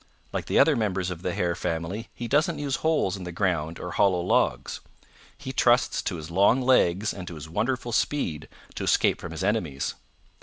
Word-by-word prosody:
Like - - -3
the - - +1
other - - +6
members 95 -4 -1
of 85 -1 -6
the 90 - -2
Hare 85 -1 0
family 85 +8 -3
he 120 - -5
doesn't 150 +5 +2
use 145 -2 -1
holes 155 - +1
in 95 - -7
the 90 - -5
ground 85 -3 -1
or 90 - -5
hollow 95 -1 +3
logs. 90 - 0 0.6
He 130 -2 -6
trusts 120 -1 +3
to 95 - -3
his 80 0 -8
long 100 +8 +4
legs 110 -6 +3
and 90 -2 -8
to 85 - -7
his 75 0 -8
wonderful 120 +8 -1
speed 85 - -1 0.2
to - - -5
escape - - +2
from 85 - -6
his 85 +3 -5
enemies. 90 -10 -1
95 Hz, 195 wpm, -26 LUFS, 85-120 Hz, 0.6 s, other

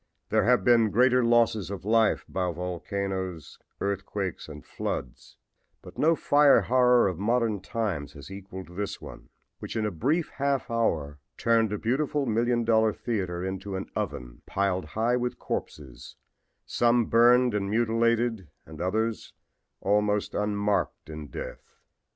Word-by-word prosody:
There 110 -1 +2
have 125 +1 +3
been 115 -3 +4
greater 125 +3 +4
losses 115 -5 +2
of 100 -1 -6
life 110 0 +2
by 90 -1 -2
volcanoes, 90 -1 -4 0.2
earthquakes 100 -3 -3
and 75 -1 -10
floods, 60 - -6 0.5
but - - -12
no 165 +2 +4
fire 145 -2 +5
horror 125 -2 +4
of 90 -3 -3
modern 115 0 +1
times 100 -7 -3
has 75 +5 -11
equaled 95 -2 -9
this 100 +1 -4
one, - - -11 0.3
which - - -7
in 110 -1 0
a 105 - -1
brief 145 - 0
half 140 -3 -1
hour 75 -11 -1 0.2
turned 115 -2 +2
a 105 - -1
beautiful 140 +6 0
million 120 +1 +1
dollar 110 -1 +3
theater 95 -7 -3
into 95 +1 -4
an 95 - -5
oven - - -5
piled 95 -2 -1
high 115 +10 0
with 125 0 -2
corpses, 65 -5 -6 0.5
some 120 0 +2
burned 120 +1 +5
and 100 -1 -1
mutilated 115 -2 +1 0.2
and 80 0 -10
others 110 +5 -2 0.5
almost 105 +1 +1
unmarked 105 -5 -1
in 75 -1 -7
death. - - -9
105 Hz, 140 wpm, -27 LUFS, 95-120 Hz, 0.5 s, fire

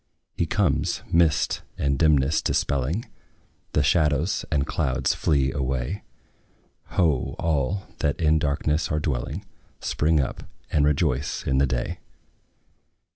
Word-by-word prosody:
He - - 0
comes, - - 0
mist 80 -4 +3 0.2
and 70 -1 0
dimness 75 -1 +3
dispelling; 70 - 0 0.7
The 75 - +3
shadows 75 +3 +2
and 70 -3 +2
clouds 65 -5 0
flee 70 -3 +1
away: 65 +7 -2 1.0
Ho! 75 -8 +2
all, 85 +4 0 0.2
that 75 -2 0
in 80 -1 +3
darkness 75 +1 0
are 75 - +1
dwelling, 70 -5 -3 0.3
Spring 80 +1 +1
up, 65 - -2 0.3
and 75 -1 +3
rejoice 75 -2 0
in 65 0 +2
the 70 - +3
day! 60 -2 -2
75 Hz, 120 wpm, -25 LUFS, 70-80 Hz, 1.0 s, mist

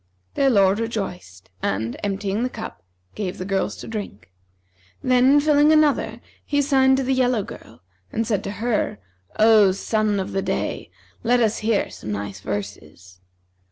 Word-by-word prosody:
Their 275 - +3
lord 200 -3 +4
rejoiced 180 - -5
and, 110 +4 -2
emptying 200 +1 -2
the 250 - 0
cup, 220 - -8 0.3
gave 190 -4 -4
the 185 - -5
girls 195 -1 -1
to - - -9
drink. 205 - -7 0.7
Then 255 +3 +5
filling 295 0 +4
another 305 -2 +2 0.2
he 285 - 0
signed 265 -2 +4
to 270 - 0
the 265 +1 +1
yellow 250 -4 +2
girl 115 - -12 0.3
and 225 - -1
said 205 -3 -1
to 200 - -3
her, 235 - 0 0.4
O 215 -3 +6
sun 210 +1 0
of 190 - -4
the 195 - -1
day, - - -3 0.3
let 245 +1 +2
us 225 -2 +1
hear 215 -1 0
some 105 - -7
nice 100 -1 -5
verses.' 95 -3 -7
210 Hz, 160 wpm, -22 LUFS, 180-250 Hz, 0.7 s, O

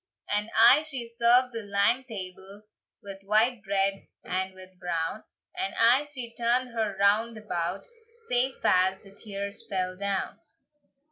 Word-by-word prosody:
And 210 +1 -1
aye 250 +6 +8
she 275 -6 -4
served 235 +2 +3
the 230 - -4
lang 205 +5 +1
tables, 195 -2 -9 0.4
With 195 -1 -8
white 215 +4 +2
bread 195 0 -1 0.2
and 185 +1 -2
with 185 -1 -13
brown; 170 +3 -3 0.3
And 375 +1 -3
aye 240 +5 +5
she 255 -5 -5
turned 240 +2 +1
her 220 -4 -2
round 215 +3 +2
about, 175 -6 -3 0.4
Sae 250 +2 +1
fast 185 +1 +2
the 195 -1 -15
tears 200 -1 -5
fell 185 -1 -2
down. 200 0 -3
210 Hz, 140 wpm, -27 LUFS, 195-235 Hz, 0.4 s, aye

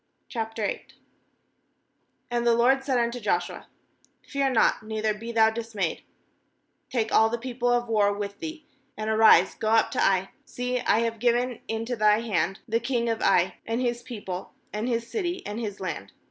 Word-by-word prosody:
Q 235 - -2 1.9
And 240 0 0
the 235 - +5
LORD 260 +3 +3
said 265 -2 +1
unto 235 +1 0
Joshua: 215 - -2 0.6
u - - -26
'Fear 275 -1 +1
not, 245 -4 +3
neither 215 0 -1
be 225 +3 -7
thou 220 -1 +4
dis 225 0 -7
mayed; 185 -5 -1 0.9
take 230 -4 -1
all 220 0 +5
the 235 - -2
people 245 0 -2
of 240 0 +2
war 210 -3 +3
with 200 0 -5
thee, 315 -1 -7 0.3
and 215 +1 -2
arise, 215 -4 +6
go 215 - -2
up 225 0 +3
to - - 0
Ai; 190 0 +2
see, 250 0 -3
I 225 -2 +2
have 230 -1 -2
given 245 +1 +1
into 230 +2 -2
thy 215 0 +4
hand 195 -4 -1
the 230 +1 0
long 235 -3 +1
of 225 - -1
Ai, 190 -2 +3
and 225 +1 -1
his 240 -1 -1
people, 205 -7 -7 0.2
and 215 +4 -2
his 235 -1 -1
city, 360 - -3
and 210 +2 -4
his 205 -4 -5
land. 100 - -5
230 Hz, 180 wpm, -26 LUFS, 215-245 Hz, 1.9 s, arise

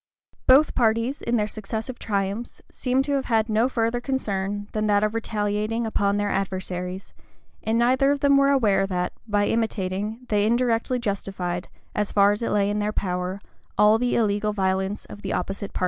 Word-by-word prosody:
Both 275 +4 +6
parties, 230 +3 +1
in 235 - 0
their 210 -2 +2
successive 220 +3 -5
triumphs, 200 +2 -2
seem 260 +1 0
to 285 - -3
have 275 -1 0
had 225 -2 +2
no 225 +3 +2
further 235 -1 0
concern 205 -6 -2
than 215 0 -1
that 205 0 +3
of 215 0 +1
retaliating 215 0 -1
upon 200 -2 +1
their 205 0 0
adversaries; 185 -1 -3 0.5
and 225 +1 0
neither 255 +3 +3
of 285 -1 -1
them 280 -1 +5
were 275 0 +5
aware 210 -8 +3
that, 180 -2 -2
by 205 -1 +2
imitating, 215 +1 -2
they 210 -1 +2
indirectly 240 +1 +1
justified, 195 -5 -3 0.3
as 210 -1 -1
far 200 0 +5
as 205 - -2
it 230 - -1
lay 205 -1 +2
in 210 - -1
their 210 0 0
power, 180 -1 -2 0.4
all 210 +2 +5
the 245 0 +1
illegal 210 -1 +1
violence 190 0 -1
of 205 - -11
the - - -3
opposite 195 +2 -3
party. - - -5
210 Hz, 180 wpm, -24 LUFS, 200-235 Hz, 0.5 s, Both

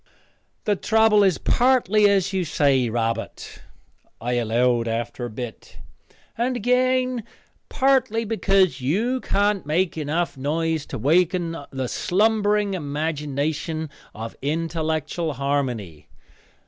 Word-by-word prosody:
"The 210 - +1
trouble 220 +1 +3
is 190 -4 +3
partly 230 -5 +3
as 195 -1 +1
you 190 -1 +1
say, 140 -6 +2
Robert," 115 0 -3 0.6
I 120 +2 -2
allowed 120 0 +1
after 115 +2 -3
a - - -5
bit, 120 0 -8 0.6
"and 250 +2 0
again 255 +1 +1 0.5
partly 260 -5 +2
because 195 - +2
you 225 - 0
can't 205 -1 +1
make 165 +3 0
enough 155 +3 -1
noise 160 +3 -1
to - - -6
awaken 165 - +1
the 130 -2 -3
slumbering 210 - +1
imagination 150 0 -3 0.2
of 115 +1 -7
intellectual 160 +1 -2
Harmony. 125 - -2
165 Hz, 110 wpm, -23 LUFS, 135-210 Hz, 0.6 s, trouble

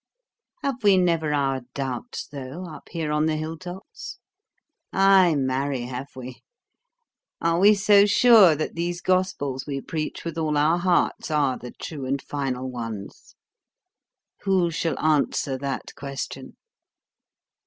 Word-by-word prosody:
Have 265 -4 -2
we 200 -2 +6
never 165 -4 +1
our 135 -2 0
doubts, 135 - -4
though, 140 +5 -8
up 160 -3 -11
here 160 -3 -3
on 150 +1 +1
the 155 - 0
hill 155 +1 -4
tops? 180 +3 -9 0.7
Ay, 195 -3 +5
marry, 135 0 -1
have 125 +3 -7
we! 130 0 -9 1.0
Are 165 0 +1
we 205 +3 +6
so 205 0 +5
sure 210 -6 +7
that 155 - -3
these 175 +1 -3
gospels 180 -9 -1
we 140 -1 -3
preach 155 +3 -5
with 165 -1 -4
all 155 -2 0
our 155 +4 +3
hearts 175 -2 +1
are 145 -4 +1
the 125 - -9
true 140 -1 -7
and 140 +1 0
final 130 -2 -3
ones? 115 -5 -7 1.0
Who 185 -3 +1
shall 165 -3 -1
answer 150 -3 +1
that 140 0 -4
question? 140 -1 -7
155 Hz, 135 wpm, -24 LUFS, 135-180 Hz, 1.0 s, sure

